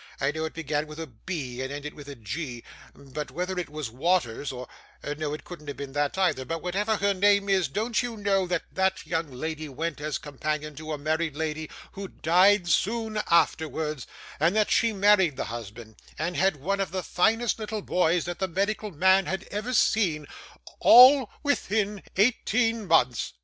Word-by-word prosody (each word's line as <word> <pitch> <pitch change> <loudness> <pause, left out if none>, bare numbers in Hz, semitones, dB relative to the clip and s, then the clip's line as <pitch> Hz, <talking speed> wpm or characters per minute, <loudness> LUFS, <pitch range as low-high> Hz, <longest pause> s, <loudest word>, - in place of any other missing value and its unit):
I 140 +1 +1
know 160 +1 -3
it 160 - -6
began 150 -1 -2
with 155 +1 -10
a 165 - -4
B, 130 -1 -6
and 130 +1 -4
ended 145 +1 -6
with 140 -5 -11
g, 125 0 -5 0.3
but 145 +2 -7
whether 180 +1 -3
it 175 - -4
was 150 -6 -5
Waters 140 -2 0
or 125 -1 -7 0.5
no, 150 -1 -3
it - - -11
couldn't 170 -4 -11
have 145 - -6
been 140 -1 -6
that, 145 +4 -1
either; 180 -9 +1
but 165 +4 -5
whatever 205 +5 0
her 200 0 +2
name 200 +1 +3
was, 190 -4 +2
don't 215 - -1
you 240 -2 -5
know 195 -2 +1
that 175 -2 -1
that 190 0 0
young 165 -3 -2
lady 155 +4 -5
went 155 +3 -4
as 150 -1 -2
companion 150 +1 -4
to 155 0 -6
a 150 - -2
married 155 +1 -1
lady 155 0 -3 0.2
who 195 0 -7
died 180 +3 +3
soon 215 +4 0
afterwards, 155 -3 +1 0.3
and 165 +6 +2
that 215 -1 +2
she 230 - +3
married 195 - +3
the - - -2
husband, 110 -1 -9 0.2
and 170 +4 -2
had 190 -2 +2
one 190 +8 -2
of 195 -3 -1
the 185 +1 -3
finest 225 +8 +1
little 215 -1 -4
boys 175 -1 +1
that 175 0 -5
the 190 - 0
medical 200 +4 -1
man 190 +3 +3
had 190 - -2
ever 215 +5 -3
seen 185 -10 +2 0.5
all 255 0 +8
within 210 -8 0
eighteen 225 0 +1
months? 125 -8 +2
170 Hz, 185 wpm, -26 LUFS, 150-200 Hz, 0.5 s, all